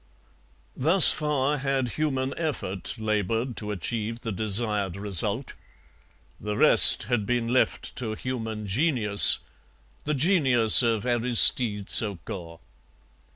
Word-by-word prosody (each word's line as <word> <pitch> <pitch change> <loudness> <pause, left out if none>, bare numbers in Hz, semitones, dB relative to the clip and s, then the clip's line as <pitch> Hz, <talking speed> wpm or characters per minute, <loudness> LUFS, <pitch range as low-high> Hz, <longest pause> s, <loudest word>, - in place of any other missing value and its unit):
Thus 165 +7 +7
far 150 -1 -4
had 135 -2 -4
human 135 -2 -5
effort 140 - -7
laboured 110 +3 -5
to 105 - -7
achieve 110 +3 -7
the 115 - -8
desired 105 -2 -3
result; 100 +5 -2 0.9
the 105 0 -8
rest - - +5
had 120 -4 -4
been 120 -1 -4
left 130 +1 -4
to 110 -4 -7
human 110 -4 -8
genius 105 - +4 0.7
the 150 +1 -4
genius 135 - +3
of 115 -2 -4
Aristide 120 -3 +1
Saucourt. 90 -5 -4
115 Hz, 110 wpm, -22 LUFS, 105-130 Hz, 0.9 s, Thus